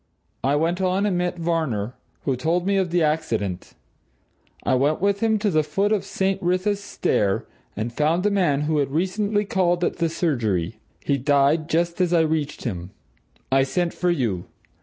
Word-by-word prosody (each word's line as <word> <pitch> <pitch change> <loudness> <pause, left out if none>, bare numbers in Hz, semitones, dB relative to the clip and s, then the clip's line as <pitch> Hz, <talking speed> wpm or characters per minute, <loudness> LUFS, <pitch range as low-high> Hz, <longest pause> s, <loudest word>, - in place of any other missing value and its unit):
I 135 +3 +2
went 170 +5 0
on 190 +2 +1
and 200 -3 +1
met 175 0 -1
Varner, 155 -10 -1 0.3
who 135 - 0
told 165 +7 0
me 200 0 +2
of 190 -2 +1
the 170 0 +2
accident. 115 - -1 0.9
I - - +1
went 140 +4 +2
with 200 +1 +1
him 220 0 +2
to 205 -1 0
the 155 -2 +3
foot 195 +8 0
of 210 -3 +1
St. 195 0 -1
Wrytha's 185 +3 +1
Stair 100 - 0 0.3
and 115 +3 -3
found 155 +6 +1
the 210 - +2
man 175 -8 +2
who 150 0 +1
had 140 -2 0
recently 200 +7 0
called 180 -2 +1
at - - 0
the 165 - +1
surgery. 115 - -1 0.3
He 140 -1 +1
died 145 +4 +2
just 170 +2 0
as 175 -1 +2
I 170 - +5
reached 155 -2 -1
him. 90 -7 -4 0.6
I 135 0 +5
sent 170 +6 0
for 180 - 0
you. 115 - 0
165 Hz, 180 wpm, -23 LUFS, 140-185 Hz, 0.9 s, I